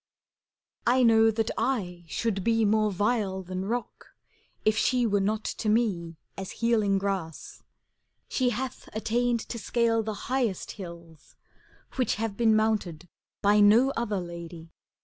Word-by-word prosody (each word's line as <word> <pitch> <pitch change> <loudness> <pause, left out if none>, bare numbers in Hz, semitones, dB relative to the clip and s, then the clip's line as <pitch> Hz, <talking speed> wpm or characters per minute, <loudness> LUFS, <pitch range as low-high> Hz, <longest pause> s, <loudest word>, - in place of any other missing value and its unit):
I 255 +2 +4
know 225 -1 +6
that 225 0 -1
I 195 -8 -2
should 195 +2 -2
be 225 0 +2
more 215 0 +2
vile 200 -1 0
than 185 +1 -4
rock. 240 +2 -5 0.5
If 215 0 +4
she 245 +2 +2
were 205 -2 +2
not 215 +2 0
to 215 - -2
me 190 -8 0 0.2
as 190 -1 -6
healing 220 -4 +2
grass: 190 -5 -4 0.7
She 255 -2 +1
hath 250 +2 -5
attained 235 +2 0
to 235 - -6
scale 230 0 +1
the 215 -1 -4
highest 245 -7 -1
hills. 170 -5 -11 0.6
Which 255 -4 +1
have 220 -2 -3
been 225 -1 +3
mounted 205 -7 0 0.3
by 205 +1 +5
no 220 +6 +6
other 215 -4 -1
lady. 170 -1 -8
215 Hz, 140 wpm, -27 LUFS, 190-230 Hz, 0.7 s, know